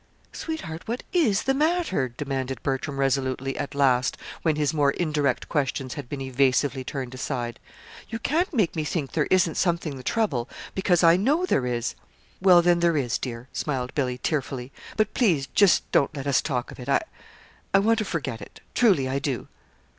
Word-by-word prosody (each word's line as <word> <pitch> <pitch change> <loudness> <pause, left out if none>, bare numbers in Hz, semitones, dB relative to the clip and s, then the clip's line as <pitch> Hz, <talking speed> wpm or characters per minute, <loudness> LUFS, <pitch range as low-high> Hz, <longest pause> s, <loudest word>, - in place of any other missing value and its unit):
"Sweetheart, 315 - -5
what 235 +3 -3
is 270 - +3
the 270 - +2
matter?" 305 - +1
demanded 135 0 -4
Bertram 135 +1 -2
resolutely, 135 0 0
at 140 - -4
last, 130 -3 +2 0.2
when 160 -2 +2
his 150 0 0
more 145 -2 +3
indirect 150 -4 0
questions 135 -3 -1
had 140 -5 -7
been 140 -2 -4
evasively 130 +1 +1
turned 130 -1 -5
aside. 125 -3 -4 0.5
"You 225 - -3
can't 325 - 0
make 215 - +1
me 155 - -1
think 150 -2 -2
there 150 -3 0
isn't 180 -3 +3
something 170 -5 0
the - - -8
trouble, 135 - 0 0.2
because 180 -2 +2
I 165 +1 +7
know 290 - +2
there 130 - +1
is!" 120 0 -1 0.5
"Well, 180 -2 +7
then, 175 0 +4
there 170 -2 +3
is, 120 -4 0
dear," 120 -1 -6
smiled 130 -3 -2
Billy, 125 -3 -1
tearfully; 130 -2 -2 0.3
"but 215 -1 +1
please 170 - +2
just 200 -3 +5
don't 140 - +2
let 135 - -5
us 140 -3 +3
talk 125 -5 -2
of - - -12
it. 125 +2 -7
I - - +3 0.7
I - - +5
want 225 +3 +3
to - - +1
forget 140 - -3
it. - - -11
Truly 195 - +4
I 135 +1 -1
do." 135 -3 -3
145 Hz, 185 wpm, -25 LUFS, 130-180 Hz, 0.7 s, I